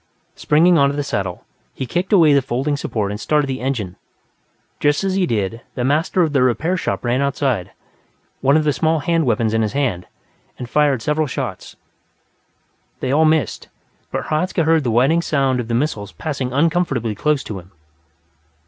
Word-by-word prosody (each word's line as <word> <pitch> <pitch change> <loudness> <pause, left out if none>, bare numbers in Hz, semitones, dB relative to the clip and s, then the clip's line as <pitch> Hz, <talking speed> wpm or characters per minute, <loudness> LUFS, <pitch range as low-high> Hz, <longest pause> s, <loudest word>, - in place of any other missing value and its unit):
Springing 165 +3 +3
onto 140 0 +3
the 145 - -1
saddle, 95 -9 -3 0.3
he 130 - -4
kicked 175 - -2
away 165 -8 +6
the 140 - +4
folding 135 +3 -1
support 105 -7 -2
and 105 - -5
started 150 +5 +1
the 135 -2 -4
engine. 115 -9 -3 0.8
Just 145 +4 +2
as 195 -1 0
he 190 -2 +1
did, 110 -1 -2
the 125 - -2
master 155 +7 +2
of 155 -3 -1
the 135 - +3
repair 130 - +1
shop 180 - -3
ran 120 +3 +1
outside, 135 -8 -1 0.7
one 140 +3 +3
of 155 - +1
the 150 -1 +1
small 160 0 +1
hand 165 -1 +1
weapons 110 -1 +1
in 110 - +2
his 110 +1 -1
hand, 125 -11 -1 0.5
and 125 - -6
fired 140 -3 +2
several 150 +2 0
shots. - - -5 1.2
They 130 - -2
all 155 +3 +4
missed, 155 -1 0 0.4
but - - -3
Hradzka 165 +3 0
heard 160 -1 +3
the 125 - -1
whining 135 +9 +3
sound 135 -6 +1
of 120 - -4
the 115 - -1
missiles 115 -7 -2
passing 135 -5 -4
uncomfortably 145 -6 +1
close 150 +6 0
to 100 -3 -6
him. 90 +1 -16
140 Hz, 180 wpm, -19 LUFS, 120-155 Hz, 1.2 s, away